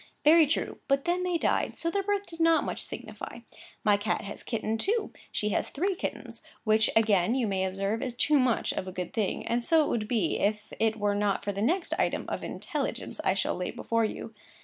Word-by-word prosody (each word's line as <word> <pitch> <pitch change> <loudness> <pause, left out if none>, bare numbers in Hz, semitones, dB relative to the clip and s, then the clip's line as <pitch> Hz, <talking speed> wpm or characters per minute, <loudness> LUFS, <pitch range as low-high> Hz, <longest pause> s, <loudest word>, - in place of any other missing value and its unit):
Very 315 +1 +7
true: 300 - -1
but 275 0 +2
then 350 +1 +1
they 360 -1 +1
died; - - 0
so 335 - -1
their 400 - +1
birth 405 0 -1
did 330 -3 -10
not 330 -1 +4
much - - -3
signify. - - -6 0.4
My 205 -1 +5
cat 205 +1 -1
has 205 -1 -7
kittened, 225 -1 -2
too; 435 - 0 0.2
she 210 - -1
has - - 0
had - - -13
three 380 +7 +1
kittens, 365 - -5 0.2
which 215 -1 +3
again 215 -1 +4
you 255 -3 +1
may 190 -2 0
observe 195 +4 -1
is 250 -3 -3
too 290 +3 +3
much 250 -3 +2
of 185 - -3
a - - -4
good 180 -1 -5
thing; 215 -4 -1
and 235 +1 0
so 320 +3 +4
it - - -2
would 215 -3 -1
be, 215 -9 +1
if 210 +1 -1
it 225 0 +2
were 205 -1 +1
not 205 -1 0
for 205 - -1
the 200 0 -4
next 340 - +1
item - - 0
of - - -3
intelligence - - -4
I - - +2
shall - - 0
lay - - -3
before 230 0 0
you. 225 +1 -4
225 Hz, 225 wpm, -29 LUFS, 205-325 Hz, 0.4 s, Very